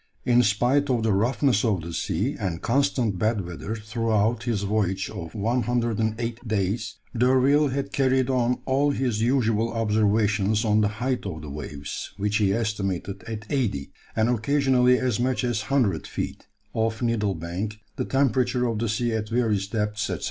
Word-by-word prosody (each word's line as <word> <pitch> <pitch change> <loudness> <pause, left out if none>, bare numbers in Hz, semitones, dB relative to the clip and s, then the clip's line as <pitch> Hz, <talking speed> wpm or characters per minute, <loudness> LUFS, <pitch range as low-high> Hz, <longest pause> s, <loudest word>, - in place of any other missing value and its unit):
In 120 0 +5
spite 125 +6 +2
of 120 -3 +1
the 110 -2 +2
roughness 120 +3 +2
of 105 -7 +1
the 85 +1 -6
sea, 100 - -1
and 90 -6 -2
constant 120 -5 +1
bad 110 0 +1
weather 90 +6 -5
throughout 110 +1 0
his 110 -5 -1
voyage 100 -2 0
of 85 -5 -7
108 115 0 -1
days, 105 +1 -1 0.2
D'Urville 130 +5 +4
had 140 +1 -3
carried 130 -1 +2
on 125 -2 +1
all 140 +2 +2
his 125 -6 0
usual 115 -2 +2
observations 105 -1 +2
on 105 0 +3
the 105 - +3 0.2
height 125 -4 -1
of 80 -5 -6
the 75 - -7
waves, 70 0 -6
which 105 +1 0
he 100 -3 +2
estimated 100 -3 -2
at 110 -1 -5
80 110 - -1 0.2
and 110 0 +2
occasionally 125 +1 +3
as 125 -3 0
much 130 +1 0
as 120 -3 0
100 110 - +1
feet, - - -5 0.3
off 110 0 -1
Needle 105 -4 +1
Bank; 90 +6 -4 0.2
the - - -1
temperature 130 -2 +1
of 115 -3 -1
the 115 0 -1
sea 120 +2 0
at 110 -1 -2
various 110 -5 +1
depths, 105 0 -2
&c. - - -2
110 Hz, 165 wpm, -25 LUFS, 105-125 Hz, 0.3 s, In